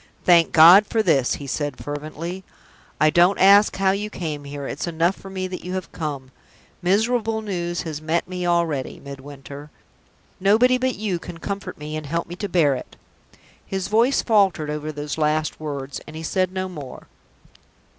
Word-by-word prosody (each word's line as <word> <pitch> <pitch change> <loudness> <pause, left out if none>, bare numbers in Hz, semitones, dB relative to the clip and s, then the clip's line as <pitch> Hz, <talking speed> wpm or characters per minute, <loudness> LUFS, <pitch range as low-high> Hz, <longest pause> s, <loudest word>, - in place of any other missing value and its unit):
"Thank 170 -2 +5
God 175 +6 +8
for 220 -1 +1
this!" 135 -10 +2
he 140 - -8
said, 145 0 -3
fervently. 155 +5 -6 0.6
"I 155 0 +4
don't 175 +4 +4
ask 200 +2 +6
how 190 0 +2
you 205 +2 -2
came 155 -7 -5
here: 140 0 -6
it's - - -4
enough 170 +3 +1
for 195 - -12
me 190 -1 -4
that 180 -1 -7
you 180 - -5
have 185 -2 -4
come. 140 -5 -5 0.5
Miserable 220 +4 +1
news 175 -4 -3
has 155 -2 -5
met 165 +2 -1
me 180 -1 -3
already, 170 -6 0
Midwinter. 140 +1 -10 0.7
Nobody 230 +6 +4
but 260 0 0
you 195 -4 -2
can 170 0 -9
comfort 200 +4 -5
me, 150 +1 -6
and 155 -2 -5
help 170 +3 -2
me 175 - -8
to 205 0 -4
bear 165 -6 +3
it." 130 - -7 0.7
His 190 0 -4
voice 230 +6 +3
faltered 195 -9 +2
over 150 +1 -4
those 150 +1 -5
last 155 0 0
words, 140 -3 -5
and 155 - -10
he 160 - -6
said 185 +3 0
no 185 0 -3
more. 145 -8 -9
170 Hz, 175 wpm, -22 LUFS, 150-195 Hz, 0.7 s, God